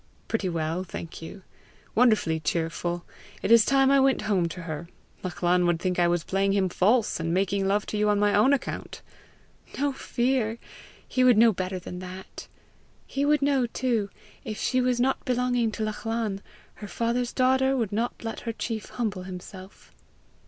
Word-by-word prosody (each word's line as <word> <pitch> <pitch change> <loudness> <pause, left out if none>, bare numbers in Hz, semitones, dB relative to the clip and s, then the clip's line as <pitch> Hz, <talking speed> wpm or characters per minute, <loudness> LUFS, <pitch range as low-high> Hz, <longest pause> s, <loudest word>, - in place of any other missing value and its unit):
"Pretty 205 -5 -1
well, 165 +1 -2
thank 170 -3 -8
you 185 +4 -9 0.5
wonderfully 215 -9 +3
cheerful. 170 +2 -2 0.4
It - - 0
is 230 -1 +8
time 270 +2 +4
I 275 - +5
went 265 -4 +3
home 195 -5 +1
to 170 +1 -7
her. 160 0 -5 0.3
Lachlan 180 -1 +1
would 170 -1 +1
think 180 0 -1
I 175 - +4
was 175 -1 +1
playing 195 +2 +1
him 195 -2 +2
false, 210 +5 +2
and 165 0 -2
making 195 +2 +1
love 205 +1 +1
to 215 - -4
you 210 0 +2
on 205 - +3
my 205 0 +3
own 215 +7 +5
account!" 280 -2 -3 0.7
"No 285 0 0
fear! 240 -3 0 0.5
He 255 - +1
would 250 -3 +6
know 225 0 +6
better 185 0 -3
than 180 0 -7
that! 185 +1 -9 0.6
He 280 +1 -1
would 295 -1 +3
know 275 -3 +2
too, 230 -4 -1 0.3
if 215 - -5
she 255 -1 +1
was 250 -1 +1
not 265 +2 +1
belonging 245 -2 +1
to 220 - -3
Lachlan, 215 -1 -2 0.4
her 205 - -6
father's 235 +3 -1
daughter 265 +1 +2
would 225 -5 -1
not 230 +4 -2
let 225 - -4
her 230 - -4
chief 225 -1 -4
humble 210 -6 -3
himself." 185 +1 -10
210 Hz, 175 wpm, -26 LUFS, 185-245 Hz, 0.7 s, is